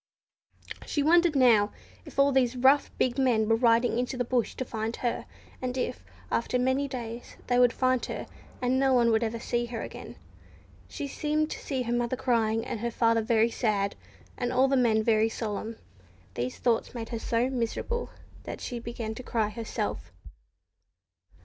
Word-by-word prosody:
She 290 - 0
wondered 340 0 +4
now 230 -6 +5 0.3
if - - -12
all 275 0 +5
these 260 -2 +2
rough, 265 +3 +4
big 255 +1 +1
men 235 -5 +3
were 225 - +4
riding 230 0 +3
into 250 +1 -2
the 245 - 0
bush 245 -1 0
to 260 - -3
find 225 0 -3
her, 240 -2 -2 0.3
and 255 0 -3
if, 95 - -3 0.3
after 245 +2 0
many 260 +3 +1
days, 240 -3 -7
they 245 0 +2
would 245 -1 +6
find 255 -1 +1
her, - - -5 0.4
and 255 +1 +2
no 265 -1 +3
one 235 -2 +4
ever 230 0 -2
see 240 +1 -1
her 235 -1 -5
again. - - -9 0.7
She 290 - -5
seemed 305 +2 -1
to - - -4
see 265 -3 -2
her 235 0 -2
mother 240 +1 0
crying, 225 -3 +1
and - - -4
her 235 +2 -1
father 230 -1 +2
very 225 0 +2
sad, 205 -5 0 0.4
and 245 -1 -1
all 255 +1 +4
the 270 - +2
men 225 -4 +3
very 220 0 +3
solemn. 220 0 -4 0.6
These 125 +4 -3
thoughts 240 +1 0
made 225 -1 -5
her 230 - -3
so 235 +3 0
miserable 260 - -2 0.4
that - - -6
she 245 -2 -5
began 230 -1 -5
to 220 - -8
cry 225 -4 -1
herself. 225 +1 -4
240 Hz, 175 wpm, -28 LUFS, 225-255 Hz, 0.7 s, would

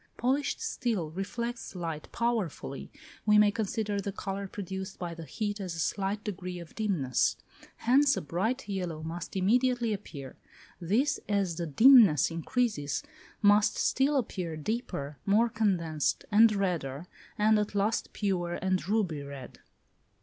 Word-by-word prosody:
Polished 270 +4 0
steel 230 - -2
reflects 230 +5 -4
light 165 -4 -5
powerfully: 220 - -2 0.3
we 210 -1 +5
may 210 -1 +6
consider 210 -1 -2
the 200 - -3
colour 195 0 -4
produced 190 0 -6
by 175 -2 -4
the 165 -1 -8
heat 205 +3 -3
as 180 -3 -4
a - - -6
slight 200 +4 -1
degree 180 -3 -5
of 170 -2 -10
dimness: 175 - +1 0.4
hence 275 +4 +3
a - - -1
bright 200 - -2
yellow 180 -6 -3
must 165 +3 -6
immediately 240 +4 +2
appear; 145 -10 -8 0.4
this, 215 - +1
as 195 -5 0
the 170 - -2
dimness 210 - +7
increases, 165 - -1 0.4
must 205 +1 +5
still 275 +2 +2
appear 180 -9 -3
deeper, 150 - -4
more 220 +4 +4
condensed, 175 -9 0
and 220 +2 +7
redder, 170 -7 -2 0.3
and 215 +1 +4
at 210 0 -2
last 205 +3 0
pure 180 -4 -1
and 185 -1 -1
ruby 190 -9 0
red. 140 -3 -9
195 Hz, 140 wpm, -29 LUFS, 170-220 Hz, 0.4 s, dimness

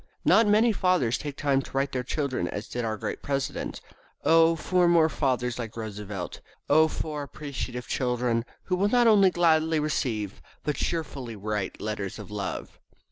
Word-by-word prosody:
Not 225 -1 +6
many 215 +3 +5
fathers 180 - +1
take 145 -2 -6
time 140 -2 +2
to - - -11
write 135 +1 +1
to - - -2
their 125 - -1
children 130 - -1
as 105 +4 -5
did 120 - -3
our 110 -1 -2
great - - -4
president. 140 0 -3 0.4
Oh, 165 +2 +5
for 180 +2 +2
more 165 -2 +5
fathers 125 -5 -1
like 115 -1 -6
Roosevelt! 105 -4 -6 0.3
Oh, 155 +2 +5
for 155 -1 -4
appreciative 135 -3 -6
children, 125 -2 0 0.2
who 185 - 0
will 200 +2 +2
not 245 +1 +4
only 205 -4 +6
gladly 160 -2 +3
receive, 115 -9 -2 0.2
but 150 +1 -1
cheerfully 140 -8 -3
write, 105 -1 -3
letters 105 -3 -4
of 105 -3 -9
love! 100 -2 -5
140 Hz, 170 wpm, -27 LUFS, 115-160 Hz, 0.4 s, Not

